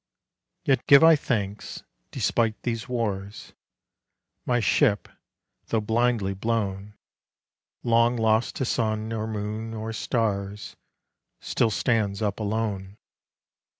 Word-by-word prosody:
Yet 135 Hz, -1 st, +1 dB
give 140 Hz, +2 st, +8 dB
I 165 Hz, 0 st, +8 dB
thanks; 105 Hz, -8 st, -3 dB, 0.3 s
despite 115 Hz, -2 st, 0 dB
these 115 Hz, -2 st, -3 dB
wars, 105 Hz, -5 st, -3 dB, 0.9 s
My 120 Hz, -1 st, +2 dB
ship 105 Hz, -2 st, +2 dB, 0.6 s
though 115 Hz, -, +1 dB
blindly 110 Hz, -2 st, +1 dB
blown, 105 Hz, -1 st, -2 dB, 0.9 s
Long 115 Hz, +1 st, +3 dB
lost 110 Hz, 0 st, +2 dB
to 130 Hz, -, -1 dB
sun 110 Hz, -2 st, -1 dB
or 110 Hz, -1 st, -2 dB
moon 110 Hz, +1 st, -4 dB
or 110 Hz, +1 st, -4 dB
stars 105 Hz, -4 st, -2 dB, 0.6 s
Still 115 Hz, -, +1 dB
stands 105 Hz, -2 st, 0 dB
up 100 Hz, 0 st, -1 dB
alone. 105 Hz, -2 st, -3 dB
110 Hz, 105 wpm, -25 LUFS, 105-115 Hz, 0.9 s, give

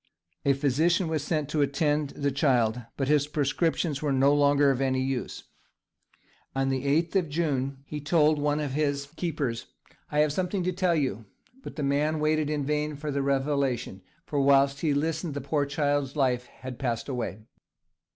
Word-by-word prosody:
A 140 Hz, -, +5 dB
physician 155 Hz, +6 st, +1 dB
was 155 Hz, -3 st, -1 dB
sent 150 Hz, -2 st, -1 dB
to 150 Hz, 0 st, 0 dB
attend 145 Hz, +1 st, 0 dB
on -, -, -8 dB
the 140 Hz, -, +2 dB
child, 125 Hz, -4 st, +2 dB, 0.2 s
but 135 Hz, -, -1 dB
his 145 Hz, 0 st, +3 dB
prescriptions 150 Hz, +1 st, 0 dB
were 150 Hz, -2 st, 0 dB
no 135 Hz, +1 st, +4 dB
longer 145 Hz, -1 st, +4 dB
of 135 Hz, 0 st, -1 dB
any 130 Hz, -1 st, +1 dB
use. 130 Hz, -2 st, -3 dB, 1.1 s
On 135 Hz, 0 st, +1 dB
the 135 Hz, 0 st, -1 dB
8th 160 Hz, +7 st, +1 dB
of 175 Hz, -5 st, 0 dB
June 140 Hz, -4 st, -1 dB
he 150 Hz, +1 st, -6 dB
told 155 Hz, 0 st, +3 dB
one 145 Hz, +1 st, +1 dB
of 145 Hz, -3 st, -2 dB
his 140 Hz, -1 st, -1 dB
keepers, 145 Hz, -9 st, -3 dB, 0.4 s
"I 150 Hz, -, +3 dB
have 150 Hz, -1 st, +2 dB
something 185 Hz, +2 st, -1 dB
to 180 Hz, -, 0 dB
tell 180 Hz, -1 st, +1 dB
you!" 125 Hz, -8 st, -1 dB, 0.4 s
but -, -, -9 dB
the 150 Hz, -, -3 dB
man 150 Hz, +3 st, +1 dB
waited 155 Hz, 0 st, +1 dB
in 150 Hz, -2 st, -1 dB
vain 150 Hz, +1 st, -1 dB
for 150 Hz, +1 st, -4 dB
the 140 Hz, 0 st, -1 dB
revelation, 135 Hz, -7 st, -1 dB, 0.2 s
for 145 Hz, -2 st, -1 dB
whilst 140 Hz, 0 st, +4 dB
he 150 Hz, -4 st, +1 dB
listened 160 Hz, +1 st, -1 dB
the -, -, -2 dB
poor 145 Hz, +1 st, 0 dB
child's 145 Hz, -1 st, 0 dB
life 125 Hz, -4 st, +1 dB
had 130 Hz, -1 st, -9 dB
passed 120 Hz, -4 st, -2 dB
away. 120 Hz, -6 st, -4 dB
145 Hz, 180 wpm, -27 LUFS, 135-150 Hz, 1.1 s, A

